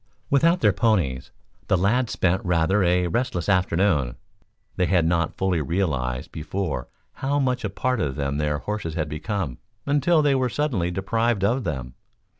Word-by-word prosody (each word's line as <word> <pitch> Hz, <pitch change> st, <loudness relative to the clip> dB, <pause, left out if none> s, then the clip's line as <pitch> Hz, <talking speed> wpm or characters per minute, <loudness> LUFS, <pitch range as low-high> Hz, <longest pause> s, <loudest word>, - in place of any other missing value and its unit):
Without 165 Hz, +5 st, +4 dB
their 105 Hz, -, +4 dB
ponies, 95 Hz, -, +1 dB, 0.4 s
the 95 Hz, -, +3 dB
lads 110 Hz, +5 st, +1 dB
spent 95 Hz, +1 st, +1 dB
rather 90 Hz, +3 st, +2 dB
a 90 Hz, 0 st, +3 dB
restless 90 Hz, -1 st, -1 dB
afternoon. 90 Hz, -8 st, +2 dB, 0.6 s
They 90 Hz, -, +1 dB
had 90 Hz, -3 st, +3 dB
not 85 Hz, -1 st, 0 dB
fully 95 Hz, -4 st, +1 dB
realized 65 Hz, -6 st, -1 dB
before 80 Hz, -4 st, -3 dB, 0.3 s
how 140 Hz, +2 st, +1 dB
much 130 Hz, -3 st, 0 dB
a 105 Hz, -, -1 dB
part 125 Hz, +3 st, -1 dB
of 70 Hz, -3 st, -1 dB
them 70 Hz, 0 st, -2 dB
their 75 Hz, -1 st, 0 dB
horses 95 Hz, -2 st, -4 dB
had 80 Hz, -2 st, -1 dB
become 80 Hz, -, -3 dB, 0.3 s
until 150 Hz, +3 st, +3 dB
they 145 Hz, -1 st, +3 dB
were 130 Hz, -2 st, +1 dB
suddenly 120 Hz, -, -1 dB
deprived 100 Hz, +4 st, 0 dB
of 115 Hz, +4 st, +1 dB
them. 65 Hz, -3 st, -4 dB
95 Hz, 160 wpm, -24 LUFS, 80-115 Hz, 0.6 s, Without